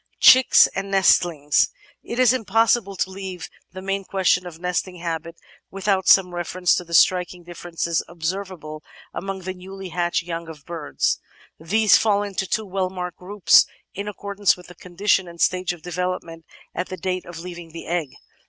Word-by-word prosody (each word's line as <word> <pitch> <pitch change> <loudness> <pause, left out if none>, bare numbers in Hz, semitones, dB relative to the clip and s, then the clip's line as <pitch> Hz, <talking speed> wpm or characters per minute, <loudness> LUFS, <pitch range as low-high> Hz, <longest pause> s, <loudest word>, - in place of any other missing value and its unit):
Chicks 260 0 +8
and 195 0 -4
Nestlings 175 -6 +3 0.3
It 235 - -6
is 255 -1 +5
impossible 225 -3 +1
to 190 - -2
leave 190 -2 -7 0.2
the 185 0 -9
main 195 0 -2
question 185 -1 +1
of 165 -2 -9
nesting 180 +1 -2
habits 170 -1 -5 0.3
without 195 -1 -1
some 180 -2 +6
reference 175 +1 0
to - - 0
the 170 -1 -3
striking 180 0 +3
differences 170 -1 -3
observable 170 -2 -5 0.3
among 195 0 -5
the 185 +1 -5
newly 190 +1 -9
hatched 175 0 -1
young 170 -1 -5
of 155 -3 -11
birds. 165 -4 -1 0.4
These 210 +7 +4
fall 205 -2 +2
into 195 -2 -3
two 220 +4 -1
well 190 -1 -2
marked 180 -2 -6
groups 195 +1 +4 0.3
in 200 +1 -5
accordance 200 -1 0
with 180 - -14
the - - -11
condition 185 +2 0
and 170 0 -12
stage 185 0 +1
of 175 -3 -10
development 175 -2 -4 0.3
at 180 - -4
the 185 - -6
date 185 -1 -3
of 175 -1 -9
leaving 170 0 -8
the 165 +1 -9
egg. 170 -4 -2
180 Hz, 170 wpm, -22 LUFS, 170-195 Hz, 0.4 s, Chicks